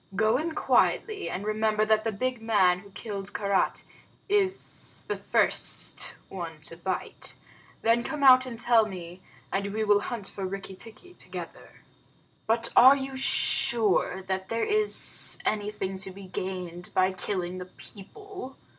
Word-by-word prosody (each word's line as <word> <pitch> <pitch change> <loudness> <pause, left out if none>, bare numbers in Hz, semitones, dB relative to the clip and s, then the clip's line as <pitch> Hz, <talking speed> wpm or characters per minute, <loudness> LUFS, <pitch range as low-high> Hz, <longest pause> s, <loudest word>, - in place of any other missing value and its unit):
Go 220 +3 +3
in 320 +3 -3
quietly, 430 -3 +1
and 195 +3 -4
remember 215 0 +1
that 215 0 +2
the 225 - -1
big 250 +3 -2
man 195 -5 +3
who 200 +1 -15
killed 200 -1 -5
Karait 200 -2 0 0.4
is 390 -2 -1
the - - -1
first - - 0
one 170 -4 -7
to 165 - -5
bite. 180 +2 -5 0.5
Then 230 +1 +3
come 300 +1 -4
out 255 -1 +7
and 235 -2 -7
tell 230 -1 +3
me, 180 -2 -9 0.3
and 200 +1 -1
we 215 +2 -2
will 205 -1 +4
hunt 220 -1 -5
for 195 - -7
Rikki 195 0 -5
tikki 225 - -9
together." - - -9 0.7
"But 230 +1 +1
are 260 +3 +9
you 270 0 -5
sure 220 -7 +3
that 190 0 -3
there 230 0 -1
is 425 0 +3
anything 205 -2 -2
to 190 0 -3
be 195 +1 -11
gained 180 -2 -5
by 185 0 +3
killing 185 -1 -3
the 180 - -6
people?" 265 - -11
210 Hz, 150 wpm, -27 LUFS, 190-240 Hz, 0.7 s, are